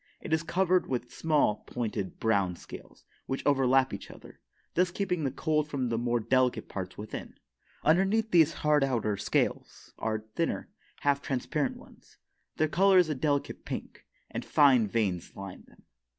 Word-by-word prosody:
It - - -4
is 160 - +3
covered 185 +1 +1
with 125 -1 -3
small, 150 -9 +2
pointed, 110 -5 -4
brown 100 -5 +1
scales, - - -12 0.2
which 135 - -3
overlap 135 -2 +3
each 100 - -7
other, - - -14 0.3
thus 180 +1 +2
keeping 180 -2 -2
the - - +2
cold 150 +3 0
from 130 -4 -1
the 115 - 0
more 120 0 +1
delicate 125 0 +1
parts 95 -2 -6
within. 105 +1 -7 0.5
Underneath 195 +7 +3
these 165 -3 +6
hard 150 -1 +4
outer 115 -6 0
scales - - -2
are 110 -1 -2
thinner, 165 - -1 0.3
half 140 0 +2
transparent 140 +1 -2
ones. - - -18 0.4
Their 155 - +3
color 190 +4 +4
is 180 -3 +5
a - - +1
delicate 145 +1 -1
pink, - - -7 0.2
and - - -4
fine 130 -7 +5
veins 100 -5 -1
line 95 -1 -9
them. - - -22
135 Hz, 160 wpm, -29 LUFS, 115-160 Hz, 0.5 s, these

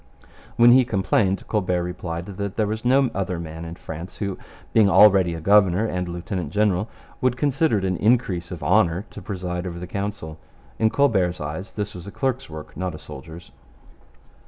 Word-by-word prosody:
When 120 0 +7
he 130 +1 +7
complained, 95 -3 0
Colbert 90 -4 0
replied 85 -1 -5
that 100 0 -5
there 110 - +2
was 110 +1 -3
no 130 +1 +3
other 95 -2 -2
man 80 0 -7
in 85 0 -7
France 85 +1 -8
who, 100 -3 -3 0.4
being 110 -3 +5
already 95 -2 +6
a - - -5
governor 100 +2 +4
and 90 -4 -2
lieutenant 85 -2 -4
general, 105 +1 +1 0.3
would 125 -1 +1
consider 145 -2 +2
it 95 - -1
an 95 -1 0
increase 100 -6 +1
of 90 - -7
honour 90 -1 +2
to 105 - -9
preside 90 -2 -4
over 85 -1 -6
the 90 - -6
Council. 95 -4 -5 0.4
In 110 - +4
Colbert's 110 -8 +2
eyes 75 +7 -6
this 105 -1 -4
was 90 +1 -9
a - - -7
clerk's 135 +2 -2
work, 80 -1 -9
not 90 0 -3
a - - -7
soldier's. 80 +3 -11
95 Hz, 180 wpm, -23 LUFS, 85-105 Hz, 0.4 s, When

